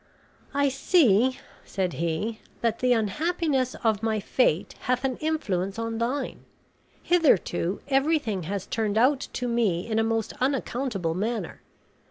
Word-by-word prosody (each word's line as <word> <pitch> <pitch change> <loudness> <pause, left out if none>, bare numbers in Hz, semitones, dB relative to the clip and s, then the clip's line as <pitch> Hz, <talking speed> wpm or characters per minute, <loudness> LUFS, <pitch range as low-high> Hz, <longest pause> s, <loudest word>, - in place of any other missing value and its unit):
"I 285 0 +3
see," 260 - +3 0.3
said 185 -3 -2
he, 170 +7 -2 0.2
"that 230 -1 0
the 250 0 +2
unhappiness 265 - 0
of 220 -3 +2
my 220 -1 0
fate 195 -5 +1
hath 250 +1 -1
an 260 -2 -1
influence 200 - -1
on 230 0 -3
thine. 255 +3 -2 0.6
Hitherto 275 - +2
everything 270 - +1
has 200 -2 -3
turned 220 -2 -1
out 260 +4 +3
to 245 - -2
me 220 -8 +1
in 225 -1 0
a - - +3
most 225 -1 -1
unaccountable 255 - -1
manner. 210 0 -3
230 Hz, 135 wpm, -26 LUFS, 205-270 Hz, 0.6 s, I